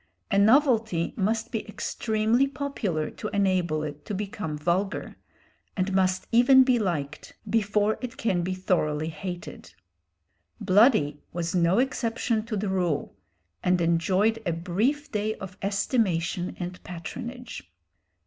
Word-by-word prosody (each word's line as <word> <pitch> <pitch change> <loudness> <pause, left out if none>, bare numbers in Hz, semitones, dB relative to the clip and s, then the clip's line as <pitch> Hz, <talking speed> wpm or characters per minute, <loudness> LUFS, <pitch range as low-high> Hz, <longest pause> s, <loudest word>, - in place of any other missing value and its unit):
A 200 - +4
novelty 225 - +3
must 220 +3 -1
be 225 - -2
extremely 220 +4 0
popular 255 - -3
to 215 - -6
enable 185 -6 +1
it 150 -1 -6
to 205 - -3
become 195 -6 -4
vulgar, 180 +6 -1 0.6
and 190 +1 0
must 190 0 +1
even 260 +3 +7
be 255 -2 +3
liked 155 -8 -3
before 210 -1 +1
it 250 0 -6
can 205 -10 0
be 185 +2 -2
thoroughly 160 -4 0
hated. 165 - -7 0.8
"Bloody" 185 - +4
was 170 0 -2
no 175 +1 +3
exception 235 -3 0
to 220 -3 -2
the 205 +1 -2
rule, 180 - -1 0.5
and 180 0 +3
enjoyed 185 +7 +2
a 170 - -1
brief 220 - -1
day 215 0 -1
of 190 -3 -9
estimation 195 -4 0
and 180 0 -6
patronage. 235 - -7
195 Hz, 130 wpm, -26 LUFS, 175-225 Hz, 0.8 s, even